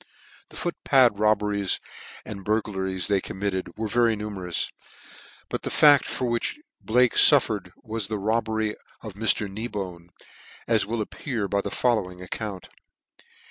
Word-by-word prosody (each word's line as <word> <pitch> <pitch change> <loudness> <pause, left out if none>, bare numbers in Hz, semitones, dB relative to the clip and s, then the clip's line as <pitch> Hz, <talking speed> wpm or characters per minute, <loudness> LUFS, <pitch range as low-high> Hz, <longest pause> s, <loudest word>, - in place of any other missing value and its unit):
The - - -15
foot 175 - -3
pad 125 -7 +4
robberies 105 -2 +1 0.5
and 100 -2 -7
burglaries 95 -3 -1
they 100 -2 +1
committed 95 -1 -4
were 110 0 -2
very 115 +1 +2
numerous, 100 -5 -4 0.8
but - - -4
the - - -4
fact 145 -3 +6
for 130 - -2
which 120 - -1 0.2
Blake 125 +1 +3
fullered 110 -10 +5
was 110 -3 -3
the 110 0 -2
robbery 110 +1 0 0.3
of 110 -3 -7
Mr. 105 0 0
Kneebone, 95 -5 -6 0.6
as 110 -4 +2
will 110 0 -1
appear 115 -2 -4
by 100 0 0
the - - -4
following 105 -8 0
account. 95 +1 -6
105 Hz, 140 wpm, -25 LUFS, 95-115 Hz, 0.8 s, fact